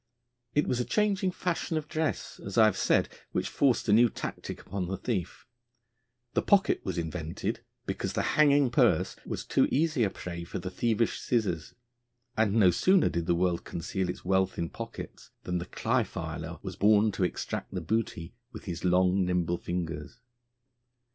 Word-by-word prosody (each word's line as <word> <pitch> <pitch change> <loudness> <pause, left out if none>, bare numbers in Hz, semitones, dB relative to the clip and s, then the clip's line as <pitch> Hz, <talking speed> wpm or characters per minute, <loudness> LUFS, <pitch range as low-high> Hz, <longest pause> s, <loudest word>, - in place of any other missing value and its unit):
It 150 - +3
was 125 - 0
a - - +2
changing 205 - +1
fashion 180 -2 -2
of 155 -1 -3
dress, 160 -1 -2
as 100 +2 -5
I 110 - +8
have 110 - +3
said, - - +2 0.3
which - - 0
forced 135 -5 +2
a 105 - +4
new 120 +2 +6
tactic - - -6
upon 95 -2 -3
the 95 +1 -3
thief; 95 -4 -3 0.9
the - - +2
pocket 200 -2 +3
was 95 -2 -3
invented 80 -1 -3 0.2
because - - -3
the - - 0
hanging 145 -4 +5
purse 110 - +3
was - - -4
too - - +3
easy 150 -3 +2
a 100 - +2
prey 85 -2 -6
for 85 - -6
the 90 0 -5
thievish 115 +2 0
scissors. 100 -10 -1 0.6
And 110 -2 +2
no 105 -5 +6
sooner 185 - +4
did 85 0 -2
the 85 - +3
world 90 -1 +1
conceal 90 +2 -3
its 90 - -6
wealth 95 0 +1
in 85 -1 -2
pockets - - -8
than 90 0 -1
the 85 - -6
cly - - +1
filer - - -6
was - - -5
born 105 +1 +4
to 95 - -2
extract 90 - -3
the 95 - -3
booty 95 -2 -2 0.2
with - - -10
his 85 -3 -5
long, 90 +1 +3
nimble 90 -1 0
fingers. 85 +1 -4
95 Hz, 175 wpm, -29 LUFS, 90-120 Hz, 0.9 s, I